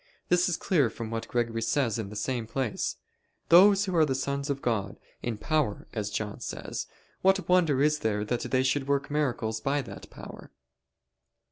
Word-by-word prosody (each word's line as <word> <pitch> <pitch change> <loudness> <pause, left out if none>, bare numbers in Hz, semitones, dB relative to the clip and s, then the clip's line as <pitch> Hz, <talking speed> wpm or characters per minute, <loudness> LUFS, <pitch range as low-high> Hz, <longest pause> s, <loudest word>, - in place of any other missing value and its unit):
This 180 +1 +3
is 170 - 0
clear 150 - +2
from 115 0 -7
what 115 0 -3
Gregory 115 -1 -1
says 115 -1 +1
in 105 -3 -4
the 105 - -9
same 120 +1 -2
place: 125 -3 -2 0.5
"Those 195 +3 +7
who 185 -2 -2
are 155 -5 +4
sons 140 +2 -2
of 140 -1 -1
God, 105 -7 -1 0.2
in 120 -3 -3
power, 140 -2 0
as 105 -2 -2
John 105 0 -4
says - - -5 0.3
what 190 -2 +3
wonder 165 -7 +3
is 150 0 +2
there 105 -3 -1
that 120 +2 -1
they 130 0 +2
should 135 +1 0
work 140 0 0
miracles 120 -7 -1
by 140 +1 0
that - - -10
power?" - - -11
135 Hz, 175 wpm, -28 LUFS, 115-150 Hz, 0.5 s, Those